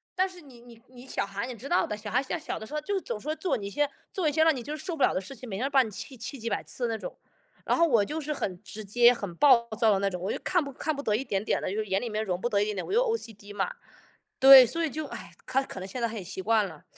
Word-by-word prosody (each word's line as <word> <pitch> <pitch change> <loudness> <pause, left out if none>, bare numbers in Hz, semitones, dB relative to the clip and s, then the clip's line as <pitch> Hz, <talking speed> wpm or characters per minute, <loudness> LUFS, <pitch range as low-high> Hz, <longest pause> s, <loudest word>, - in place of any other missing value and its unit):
但 375 +1 +2
是 365 -2 -13
你 260 -5 -15
你 235 -1 -16
你 250 0 -14
小 - - -2
孩 200 +3 -4
你 255 - -5
知 255 +6 -9
道 355 - +3
的， 210 - -4
小 210 0 -7
孩 255 +5 +1
现 305 - -3
在 310 - -12
小 - - -3
的 220 - -8
时 295 - -11
候 300 - -1
就 405 - -3
是 385 - -1
总 210 - -4
说 305 +7 -3
做 365 - -1
你 200 -3 -4
一 - - -5
些 290 +7 +1 0.2
做 370 -6 0
一 - - +3
些 315 +2 +3
让 320 -2 +4
你 245 - -5
就 300 - -4
是 - - -8
受 355 -3 -3
不 285 - 0
了 - - +4
的 185 - -1
事 270 - -9
情， 250 +1 -10
每 195 - -4
天 245 - -1
都 - - -1
把 270 -2 +5
你 220 - -7
气 255 +7 -6
气 235 +4 -5
几 230 +1 -3
百 - - -2
次 245 - -3
的 225 - -1
那 - - -4
种。 - - -7 0.5
然 - - +1
后 335 - +5
我 230 -8 +4
就 300 +10 -4
是 300 0 -3
很 185 -9 -4
直 210 +2 -8
接、 240 +4 +5
很 200 -7 -6
暴 245 0 +5
躁 220 -2 +5
的 195 - +2
那 195 0 +1
种， 180 - -5
我 185 +4 -2
就 - - -4
看 355 -3 +2
不 280 -1 -7
看 310 +3 -2
不 280 - -5
得 210 - +1
一 240 - -1
点 200 -6 -2
点 - - 0
的 - - -2
就 200 - -3
是 220 - -1
眼 195 -1 0
里 240 - -3
面 215 +1 -2
容 180 -1 -2
不 240 - 0
得 205 -3 +2
一 - - +3
点 210 -1 -3
点， 185 - -3
我 - - -7
又 455 - +4 0.2
OCD 205 - -8
嘛 205 - -1 0.7
对， 270 -1 +11
所 330 +8 -2
以 - - -1
就 310 +3 -4
唉， - - -9
他 270 - +1
可 195 - -8
能 185 - -6
现 240 +6 -6
在 235 - +2
他 225 - -7
也 205 - -5
习 190 +1 -6
惯 215 0 +2
了， 160 -5 -12
240 Hz, 390 characters per minute, -28 LUFS, 205-290 Hz, 0.7 s, 对